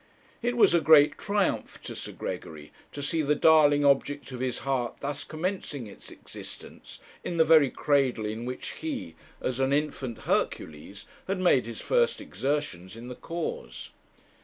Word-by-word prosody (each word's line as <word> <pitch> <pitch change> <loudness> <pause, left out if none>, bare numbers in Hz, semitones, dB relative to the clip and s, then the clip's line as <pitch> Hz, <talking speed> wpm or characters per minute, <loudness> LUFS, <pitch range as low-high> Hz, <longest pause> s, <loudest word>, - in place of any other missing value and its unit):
It 245 0 -1
was 230 - +6
a 170 - +4
great 150 -1 +6
triumph 200 -2 -1
to - - -6
Sir - - -6
Gregory 75 -2 -7 0.2
to 145 - -6
see 160 +3 0
the 150 0 +2
darling 145 -1 +5
object 140 0 +1
of 125 - -6
his 130 -1 -1
heart 130 -3 -1
thus 145 0 -3
commencing 155 - -4
its 100 - -12
existence - - -11 0.3
in 170 - -3
the 160 - +5
very 155 -4 +6
cradle 135 -6 +1
in 110 +2 -4
which 125 +1 -5
he, 305 -5 -5 0.3
as 130 0 -2
an 135 0 +2
infant 140 -5 -2
Hercules, 80 +6 -2 0.2
had 195 +1 -1
made 155 -10 +3
his 115 - -7
first 485 -1 +2
exertions 130 - -3
in 120 +2 -9
the 125 - -6
cause. 165 - -6
145 Hz, 160 wpm, -28 LUFS, 125-160 Hz, 0.3 s, was